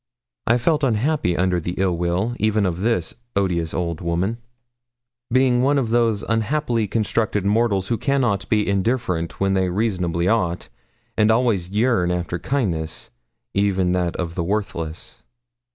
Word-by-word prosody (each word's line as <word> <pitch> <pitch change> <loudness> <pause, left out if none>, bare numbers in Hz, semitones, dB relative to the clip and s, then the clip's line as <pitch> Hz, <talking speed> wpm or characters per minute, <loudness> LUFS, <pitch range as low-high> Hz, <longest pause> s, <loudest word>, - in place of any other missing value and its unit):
I 120 - +4
felt 150 +5 +1
unhappy 125 - +1
under 90 -1 +1
the 90 +2 -4
ill 95 -2 +1
will 90 +7 -1
even 110 -1 +2
of 90 -1 -2
this 115 +2 0 0.2
odious 90 -5 0
old 85 -3 -3
woman, 90 +7 -1 0.9
being 125 -1 +3
one 140 +3 +3
of 120 -5 0
those 115 -3 +2
unhappily 115 0 0
constructed 105 -1 0
mortals 100 -2 +1
who 115 - 0
cannot 120 -9 0
be 105 -2 +2
indifferent 100 -4 -1
when 95 0 +2
they 95 -1 +1
reasonably 90 -4 0
ought, 90 -6 0 0.5
and 105 0 +3
always 110 -6 +2
yearn 105 -3 +2
after 90 -1 -2
kindness, 85 - -2 0.4
even 95 -2 +1
that 90 -2 0
of 85 -2 -3
the 85 - -2
worthless. 85 -4 -4
100 Hz, 145 wpm, -22 LUFS, 90-115 Hz, 0.9 s, I